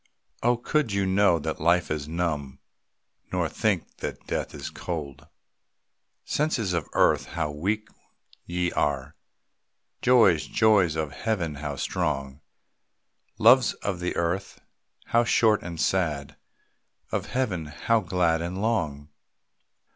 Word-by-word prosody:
Oh, 120 +1 +3
could 125 0 0
you 100 -1 +1
know 95 -2 +4
that 80 0 -4
life 85 +1 +2
is 75 -1 -2
numb, 75 -5 -2 0.7
Nor - - 0
think - - -1
that - - -6
death - - -3
is - - -6
cold! 75 -3 -6 1.0
Senses 125 - 0
of 85 -3 -2
earth, - - +3
how 80 -3 -3
weak 100 +9 -2 0.6
ye 90 0 -1
are! 70 -3 -1 0.9
Joys, 115 -11 +5
joys 100 -7 +3
of 80 -2 -2
Heaven 95 -5 -2
how 70 0 -5
strong! 70 -3 -2 1.0
Loves - - +6
of 95 -3 -4
the 90 0 -2
earth, 90 +3 -2 0.5
how 120 +1 +3
short 110 -2 +3
and 85 -1 -7
sad, 75 -7 0 0.8
Of - - -2
Heaven 100 -12 -1
how 110 +10 +1
glad 90 -4 +1
and 90 +3 -4
long! 80 -10 -1
85 Hz, 125 wpm, -26 LUFS, 75-100 Hz, 1.0 s, Loves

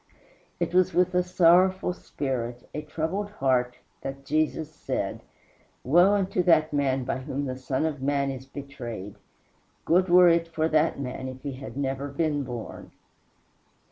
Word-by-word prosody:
It - - -1
was 185 -1 +3
with 180 +1 +3
a 180 - +4
sorrowful 180 +1 +4
spirit, 125 -7 -4
a 150 - -3
troubled 165 +7 -3
heart, 125 -5 +1 0.2
that 135 0 -7
Jesus 155 +1 0
said, - - -3 0.6
"Woe 175 +9 +5
unto 190 -2 0
that 160 -3 +3
man 135 -2 +1
by 130 - -2
whom 140 +1 -4
the 130 -1 -3
Son 130 +3 -2
of 150 -4 -3
man 140 0 0
is 130 0 -8
betrayed: 120 -8 -7 0.7
good 180 +2 +3
were 180 0 +7
it 170 0 +3
for 160 -1 0
that 155 -1 +2
man 130 -1 -5
if 130 0 -9
he 140 -2 -4 0.2
never 135 0 -2
had 140 0 -12
been 150 -3 +1
born." 120 -3 -7
145 Hz, 155 wpm, -26 LUFS, 130-170 Hz, 0.7 s, were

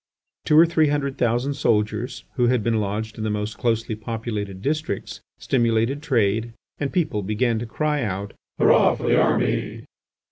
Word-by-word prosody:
Two 150 - +4
or 165 - +9
three 160 -2 +2
hundred 140 -2 -1
thousand 120 +4 +1
soldiers, 110 -2 -1
who 125 -3 +2
bad 125 -3 +2
been 115 -1 +1
lodged 110 +2 -3
in - - -3
the 110 - -1
most 105 +1 -3
closely 115 -2 0
populated 110 -3 -5
districts, 150 -2 -3 0.2
stimulated 120 +2 +1
trade, 115 -5 0 0.3
and 140 -2 -2
people 150 - 0
began 110 +3 0
to 120 - -5
cry 150 +4 -1
out: 100 -2 -3 0.2
"Hurrah - - +5
for - - -9
the - - +4
army!" - - 0
115 Hz, 165 wpm, -23 LUFS, 105-140 Hz, 0.3 s, or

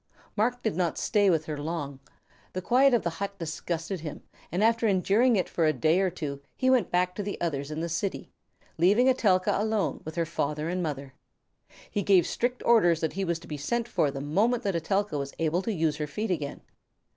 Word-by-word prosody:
Marc 245 +4 0
did 220 - 0
not 175 -2 0
stay 205 -3 +2
with 160 -3 +2
her 150 -2 -4
long. 145 -3 -4 0.5
The 185 - -3
quiet 255 +4 +4
of 235 - 0
the 170 - -1
hut 200 0 -3
disgusted 165 +2 -4
him, 155 -2 -7 0.3
and 180 +5 0
after 230 0 +3
enduring 210 +5 +3
it 185 - +1
for 165 -2 +1
a 155 - +3
day 155 +7 +2
or 190 -1 +2
two 150 -6 -5 0.2
he 260 0 +3
went 245 -8 +3
back 180 0 +1
to 205 - -4
the 200 0 -4
others 145 -4 -2
in 155 +1 -4
the 170 - -1
city, 185 +4 -3 0.5
leaving 205 +9 +4
Etelka 200 -8 +3
alone 215 -1 0
with 155 - -7
her 170 -1 0
father 150 +1 -2
and 180 +1 -1
mother. 140 -4 -4 0.8
He 205 - 0
gave 185 -3 +4
strict 245 +1 -2
orders 175 -9 +5
that 160 - -1
he 195 - -2
was 170 -3 0
to 170 - -13
be 150 - -5
sent 235 +12 -1
for 170 -10 +1
the 135 0 -5
moment 215 - +1
that 195 -4 -1
Etelka 180 -1 0
was 140 0 -5
able 165 +2 +1
to 225 - -2
use 160 -6 0
her 150 -1 -3
feet 210 +8 -3
again. 150 -5 -3
180 Hz, 215 wpm, -27 LUFS, 155-210 Hz, 0.8 s, orders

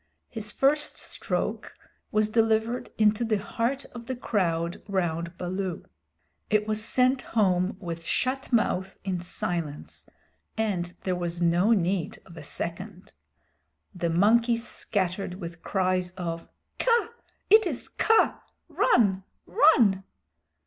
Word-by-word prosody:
His 215 -2 -3
first 290 +5 +2
stroke - - -4 0.4
was 215 0 +2
delivered 225 +2 +1
into 215 +1 +3
the 220 -2 +1
heart 235 +7 -2
of 235 -1 -9
the 260 - -2
crowd 170 -8 -1
round 170 -3 -2
Baloo. 185 0 -3 0.6
It 210 0 +2
was 215 0 -1
sent 255 +2 +2 0.2
home 185 -2 +2
with 170 -3 -6
shut 260 +10 -1
mouth 190 -5 +1
in 185 -2 -2
silence, 170 -3 -5 0.5
and 185 -5 -1
there 185 -1 0
was 175 -1 -3
no 175 +6 +3
need 185 -3 0
of 170 - -14
a 165 - -8
second. 180 +5 -6 0.8
The 170 -2 -2
monkeys 230 +7 +3
scattered 190 -2 -2
with 170 -2 -8
cries 185 -2 0
of 165 -2 -4 0.3
"Kaa! 470 -2 +3 0.4
It 435 -2 +7
is 280 -8 -3
Kaa! 450 0 +2 0.3
Run! 195 -5 +3 0.2
Run!" 225 -11 +4
195 Hz, 120 wpm, -27 LUFS, 175-230 Hz, 0.8 s, It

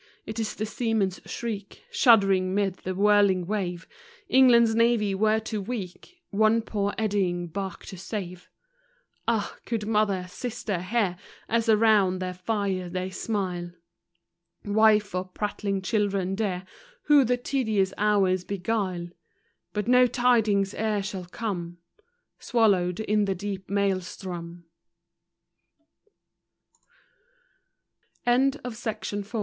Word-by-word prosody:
it 220 +1 -5
is 220 -1 -2
the 215 - -2
seamen's 220 -4 -1
shriek, 210 -4 -6
Shuddering 195 - +4
'mid 195 -2 0
the 185 0 -5
whirling 200 -2 +4
wave, 185 -3 -3 0.4
England's 235 -5 +6
navy 230 -3 +2
were 215 +3 +2
too 220 -1 -4
weak 225 - -7
One 220 +2 +3
poor 205 -2 -2
eddying 195 -5 0
bark 190 +2 -6
to 190 - -9
save. 180 -3 -6 0.8
Ah, 225 -3 0
could 225 -3 -3
mother, 210 -4 +1
sisters, 205 -3 -4
hear, 205 -4 0 0.3
As 230 0 0
around 210 -4 +4
their 185 0 -4
fire 185 -1 -2
they 185 +1 -3
smile; 185 -4 -3 0.9
Wife, 210 -1 +3
or 185 0 -1
prattling 195 0 -3
children 200 -3 0
deaf, 190 -3 -2 0.4
Who 295 -2 +6
the 250 0 +1
tedious 220 -7 0
hours 195 -3 +2
beguile— 185 -3 -2 0.6
But 210 +1 -3
no 250 0 +6
tidings 225 -6 +2
e'er 215 -2 -1
shall 190 -2 -5
come; 175 -3 -5 0.6
Swalloweck 195 -7 +2
lost, - - -6
in 210 0 +2
deep 195 0 -6
Maelstro 185 -3 -3
205 Hz, 110 wpm, -26 LUFS, 185-220 Hz, 0.9 s, England's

